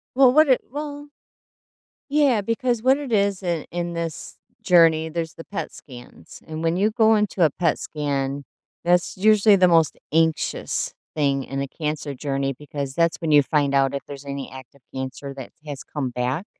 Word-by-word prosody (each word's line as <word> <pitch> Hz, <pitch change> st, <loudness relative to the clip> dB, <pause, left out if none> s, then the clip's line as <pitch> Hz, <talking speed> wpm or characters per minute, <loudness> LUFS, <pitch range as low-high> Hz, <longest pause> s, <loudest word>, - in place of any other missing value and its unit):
Well, 260 Hz, -2 st, +6 dB
what 310 Hz, 0 st, +6 dB
it 260 Hz, -, +4 dB
well 290 Hz, 0 st, -6 dB, 1.0 s
Yeah, 280 Hz, -7 st, +3 dB
because 230 Hz, +2 st, -1 dB
what 260 Hz, +3 st, +4 dB
it 280 Hz, -4 st, -6 dB
is 200 Hz, -2 st, +1 dB
i 170 Hz, -3 st, -2 dB
in 175 Hz, 0 st, -3 dB
this 165 Hz, -2 st, -5 dB, 0.3 s
journey, 165 Hz, -4 st, +5 dB
there's 165 Hz, 0 st, -4 dB
the 165 Hz, -, -9 dB
PET 205 Hz, -, -5 dB
scans. 125 Hz, -3 st, -13 dB
And 160 Hz, +1 st, -5 dB
when 165 Hz, +2 st, +1 dB
you 210 Hz, +3 st, +3 dB
go 220 Hz, 0 st, +4 dB
into 210 Hz, -4 st, +1 dB
a 150 Hz, -, +2 dB
PET 165 Hz, -1 st, 0 dB
scan, 140 Hz, -2 st, -3 dB, 0.4 s
that's 175 Hz, 0 st, +2 dB
usually 210 Hz, +1 st, +5 dB
the 185 Hz, -1 st, +5 dB
most 165 Hz, -3 st, +3 dB
anxious 160 Hz, 0 st, 0 dB, 0.2 s
thing 140 Hz, -3 st, +1 dB
in 135 Hz, 0 st, -4 dB
a 140 Hz, -, -3 dB
cancer 150 Hz, -2 st, -4 dB
journey 135 Hz, 0 st, -2 dB
because 140 Hz, -2 st, -6 dB
that's 170 Hz, -1 st, +2 dB
when 160 Hz, -2 st, -1 dB
you 145 Hz, -1 st, +6 dB
find 140 Hz, -2 st, +1 dB
out 135 Hz, 0 st, +3 dB
if 140 Hz, -, -3 dB
there's 140 Hz, 0 st, -9 dB
any 140 Hz, -1 st, -5 dB
active 130 Hz, +1 st, -13 dB
cancer 130 Hz, +1 st, -5 dB
that 130 Hz, -, -8 dB
has 145 Hz, -2 st, -7 dB
come 140 Hz, -4 st, -4 dB
back. 125 Hz, -, -2 dB
160 Hz, 180 wpm, -23 LUFS, 140-200 Hz, 1.0 s, Well